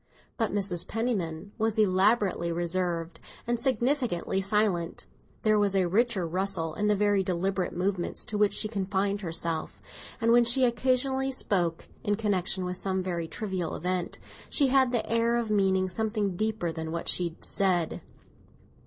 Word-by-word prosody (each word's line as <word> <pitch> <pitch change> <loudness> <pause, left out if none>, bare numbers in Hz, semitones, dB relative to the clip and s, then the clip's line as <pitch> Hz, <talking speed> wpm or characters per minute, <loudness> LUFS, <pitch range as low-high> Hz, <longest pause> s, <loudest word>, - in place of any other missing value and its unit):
But 225 -4 -1
Mrs. 190 -4 0
Penniman 205 -6 -2
was 220 0 0
elaborately 195 -3 +2
reserved 170 -1 -2 0.3
and 240 0 -1
significantly 240 - 0
silent; 195 -4 0 0.4
there 215 -1 +4
was 200 -1 +1
a 190 -1 +3
richer 210 0 +1
rustle 175 -2 +1
in 210 +5 -1
the 210 - +3
very 205 -1 +2
deliberate 185 0 -1
movements 185 -1 -1
to 215 -3 -3
which 210 -1 +3
she 215 - -1
confined 200 -1 -1
herself, 165 -2 -3 0.4
and 230 -1 +2
when 240 0 +6
she 245 +2 +4
occasionally 265 +2 +1
spoke, 175 -9 0 0.2
in 205 - +1
connexion 190 -3 0
with 180 0 -3
some 190 -1 -1
very 170 -3 -3
trivial 185 -4 -3
event, 180 +1 -2 0.3
she 280 -3 +3
had 260 -1 +4
the 240 -3 0
air 230 +1 +2
of 235 -2 -1
meaning 190 -2 +2
something 210 0 -1
deeper 215 -4 -1
than 160 0 -5
what 170 0 -4
she 170 -2 +1
said. 180 -4 0
195 Hz, 155 wpm, -28 LUFS, 180-220 Hz, 0.4 s, when